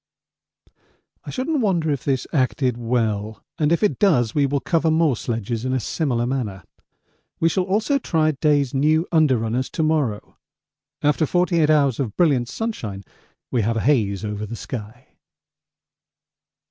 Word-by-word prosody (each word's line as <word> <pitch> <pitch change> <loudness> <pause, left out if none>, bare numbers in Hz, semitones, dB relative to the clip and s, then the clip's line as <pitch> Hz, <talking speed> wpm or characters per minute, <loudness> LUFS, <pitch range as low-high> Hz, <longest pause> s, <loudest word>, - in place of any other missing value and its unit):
I - - -7
shouldn't 285 +3 -1
wonder 170 -7 +1
if 140 -3 -2
this 135 -3 0
acted 130 -2 +1
well, 110 -3 -2 0.2
and 150 0 +2
if 170 - +2
it 210 - +1
does 130 - +3
we 145 -2 +2
will 140 +1 0
cover 165 +2 +1
more 160 -4 +3
sledges 115 0 -3
in 130 0 -1
a 130 - +1
similar 120 -1 -1
manner. 115 -8 -3 0.8
We 165 - +3
shall 185 +2 0
also 220 +9 +1
try 160 -9 +1
Day's 145 -2 +1
new 155 +5 +2
under 155 -6 +4
runners 115 +4 -2
to 160 - -2
morrow. 150 -9 -1 0.7
After 150 +1 +2
48 175 -2 +2
hours 140 -5 +3
of 115 -7 -3
brilliant 135 -9 +2
sunshine 120 - -4 0.5
we 120 - +1
have 115 +2 0
a - - 0
haze 105 -7 +1
over 105 0 -4
the 115 - -6
sky. 115 +2 -8
135 Hz, 155 wpm, -22 LUFS, 115-160 Hz, 0.8 s, under